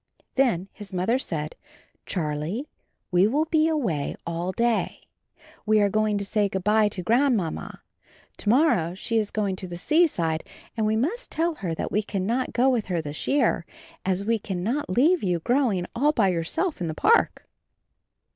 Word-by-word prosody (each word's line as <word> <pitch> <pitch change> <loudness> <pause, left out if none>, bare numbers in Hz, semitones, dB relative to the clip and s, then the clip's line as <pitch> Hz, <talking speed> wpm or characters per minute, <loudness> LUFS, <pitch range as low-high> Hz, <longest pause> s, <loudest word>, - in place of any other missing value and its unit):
Then 230 -9 +2
his 205 -2 -10
Mother 190 +8 +1
said: 155 - -3 0.5
"Charlie, 165 - -2 0.4
we 180 +2 +5
will 290 +8 +1
be 315 -1 +2
away 225 - -1
all 170 +2 -2
day. 235 +3 0 0.6
We 215 0 +3
are 205 -1 +3
going 215 0 +1
to 200 - -3
say 205 0 +1
good 190 -1 -3
by 210 +1 +4
to 190 -3 -6
Grandmamma; 230 - 0 0.5
to 205 - -2
morrow 220 - +3
she 225 +4 0
is 210 -2 -1
going 205 -3 -1
to 185 - -6
the 175 -1 -6
seaside 175 - +2 0.3
and 220 -2 0
we 215 - +2
must 340 - -1
tell 335 +1 0
her 180 - -4
that - - -4
we 210 - +2
cannot 215 +5 -2
go 250 +2 +2
with 245 -5 +1
her 180 -2 -1
this 150 -1 -5
year, 285 +1 +2 0.4
as 190 +1 0
we 230 0 +1
can 190 -3 -4
not 255 +6 -1
leave 310 - +3
you 180 -3 +1
growing 225 - +1
all 290 +5 +3
by 205 -8 +3
yourself 185 - -1
in 170 - -1
the 155 - -4
park." 460 - +2
210 Hz, 175 wpm, -25 LUFS, 180-260 Hz, 0.6 s, we